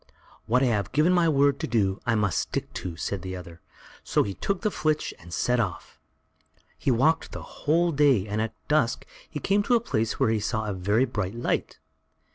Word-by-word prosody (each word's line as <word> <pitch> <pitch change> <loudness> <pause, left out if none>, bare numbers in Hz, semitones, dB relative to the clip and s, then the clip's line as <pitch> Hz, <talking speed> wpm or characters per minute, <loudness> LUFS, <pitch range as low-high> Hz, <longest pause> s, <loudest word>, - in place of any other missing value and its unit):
"What 125 +3 +3
I - - +4
have 110 -3 0
given 155 +6 +4
my 175 -2 +4
word 140 -2 +3
to - - -2
do, 100 -4 +1
I 115 - +3
must 105 -5 +1
stick - - -3
to," 90 -2 -5
said 95 +3 -3
the 95 0 -5
other; 85 -3 -10 0.4
so - - +2
he 100 - -4
took 195 - -2
the 215 - 0
flitch 155 -3 -1
and 85 0 -13
set 125 +9 +1
off. 100 -7 -4 0.8
He - - -2
walked 135 +7 +2
the - - -6
whole 170 +3 +1
day, 140 - +3
and 105 +1 -2
at 110 0 -3
dusk 130 -5 +1 0.2
he 150 - -5
came 200 +7 +2
to 240 +4 +2
a - - +4
place 115 - -2
where 110 - +3
he 110 - +1
saw 110 +1 -2
a 105 - -2
very 100 +7 +2
bright 105 -5 -3
light. 120 - -2
115 Hz, 210 wpm, -26 LUFS, 100-150 Hz, 0.8 s, I